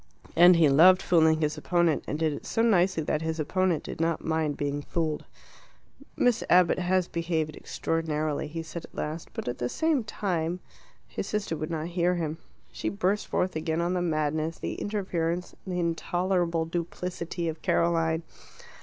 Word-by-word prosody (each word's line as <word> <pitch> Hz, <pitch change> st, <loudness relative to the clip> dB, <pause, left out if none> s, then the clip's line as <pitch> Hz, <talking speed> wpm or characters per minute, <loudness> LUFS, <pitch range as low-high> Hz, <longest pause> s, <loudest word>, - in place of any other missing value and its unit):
And 175 Hz, +2 st, +8 dB
he 165 Hz, -2 st, +5 dB
loved 175 Hz, +7 st, +7 dB
fooling 160 Hz, -2 st, +4 dB
his 150 Hz, -1 st, 0 dB
opponent, 170 Hz, -3 st, +1 dB
and 150 Hz, -, -2 dB
did 155 Hz, -1 st, +1 dB
it -, -, -8 dB
so 225 Hz, -, +1 dB
nicely 185 Hz, -6 st, +3 dB
that 150 Hz, +1 st, -1 dB
his 160 Hz, 0 st, -2 dB
opponent 175 Hz, +1 st, +1 dB
did -, -, -6 dB
not 165 Hz, 0 st, 0 dB
mind 160 Hz, -2 st, 0 dB
being 145 Hz, 0 st, -2 dB
fooled. 155 Hz, 0 st, -2 dB, 0.9 s
"Miss 245 Hz, -2 st, +2 dB
Abbott 180 Hz, 0 st, +5 dB
has 185 Hz, 0 st, +1 dB
behaved 160 Hz, -3 st, -2 dB
extraordinarily," 155 Hz, -2 st, -2 dB
he 165 Hz, +2 st, -5 dB
said 165 Hz, +1 st, -7 dB
at -, -, -20 dB
last; 155 Hz, +2 st, -4 dB
"but -, -, -5 dB
at 120 Hz, -, -3 dB
the 120 Hz, -, -1 dB
same 315 Hz, -, +1 dB
time 180 Hz, -5 st, -2 dB, 0.3 s
" -, -, -32 dB
His -, -, -2 dB
sister 210 Hz, -6 st, -2 dB
would 155 Hz, 0 st, -4 dB
not 160 Hz, -2 st, -2 dB
hear 175 Hz, 0 st, +1 dB
him. 160 Hz, -2 st, -3 dB, 0.3 s
She -, -, -3 dB
burst 200 Hz, +1 st, 0 dB
forth 185 Hz, -1 st, -1 dB
again 160 Hz, +1 st, -1 dB
on 175 Hz, +1 st, 0 dB
the 180 Hz, -, 0 dB
madness, 155 Hz, -1 st, -1 dB
the -, -, -4 dB
interference, 180 Hz, -4 st, -2 dB
the 180 Hz, -1 st, -2 dB
intolerable 175 Hz, 0 st, 0 dB
duplicity 170 Hz, 0 st, -4 dB
of 160 Hz, -1 st, -4 dB
Caroline. 165 Hz, -1 st, +1 dB
165 Hz, 170 wpm, -27 LUFS, 160-180 Hz, 0.9 s, And